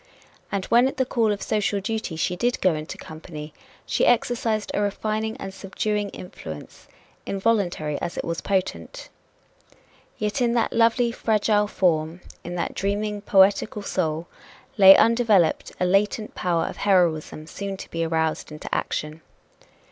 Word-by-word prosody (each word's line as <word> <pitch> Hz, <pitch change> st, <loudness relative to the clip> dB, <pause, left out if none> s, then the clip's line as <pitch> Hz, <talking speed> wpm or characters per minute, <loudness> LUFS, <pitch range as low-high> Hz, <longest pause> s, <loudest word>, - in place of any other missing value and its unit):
And 195 Hz, -2 st, -2 dB
when 240 Hz, +2 st, +4 dB
at 270 Hz, -, -5 dB
the 260 Hz, -, +2 dB
call 230 Hz, -3 st, +1 dB
of 205 Hz, -, -3 dB
social 205 Hz, -1 st, 0 dB
duty 215 Hz, -3 st, -3 dB
she 170 Hz, +2 st, -1 dB
did 245 Hz, +6 st, 0 dB
go 185 Hz, -, +3 dB
into 155 Hz, 0 st, -6 dB
company, 155 Hz, -1 st, -9 dB, 0.3 s
she -, -, 0 dB
exercised 235 Hz, -3 st, +1 dB
a -, -, 0 dB
refining 215 Hz, +2 st, -2 dB
and 195 Hz, -6 st, -7 dB
subduing 205 Hz, +1 st, -2 dB
influence, 80 Hz, -, -10 dB, 0.4 s
involuntary 190 Hz, -8 st, 0 dB
as 170 Hz, -, -4 dB
it -, -, -3 dB
was 165 Hz, 0 st, -3 dB
potent. 185 Hz, -, -3 dB, 1.1 s
Yet 210 Hz, +5 st, -2 dB
in 235 Hz, -1 st, +2 dB
that 235 Hz, -1 st, +1 dB
lovely, 235 Hz, +1 st, +3 dB
fragile 210 Hz, -2 st, +1 dB
form, 165 Hz, -3 st, 0 dB, 0.2 s
in 175 Hz, +1 st, -6 dB
that 175 Hz, -, -2 dB
dreaming, 205 Hz, +1 st, -2 dB
poetical 200 Hz, +1 st, +3 dB
soul, 165 Hz, -4 st, -1 dB, 0.5 s
lay 195 Hz, -2 st, +9 dB
undeveloped 225 Hz, -7 st, +3 dB
a 180 Hz, -, +2 dB
latent 205 Hz, +3 st, +1 dB
power 170 Hz, -2 st, 0 dB
of -, -, -6 dB
heroism 170 Hz, -6 st, +1 dB
soon 195 Hz, +4 st, -6 dB
to -, -, -9 dB
be 165 Hz, 0 st, -1 dB
aroused 160 Hz, -1 st, -1 dB
into 150 Hz, -, -8 dB
action. 150 Hz, +1 st, -3 dB
195 Hz, 150 wpm, -24 LUFS, 165-215 Hz, 1.1 s, lay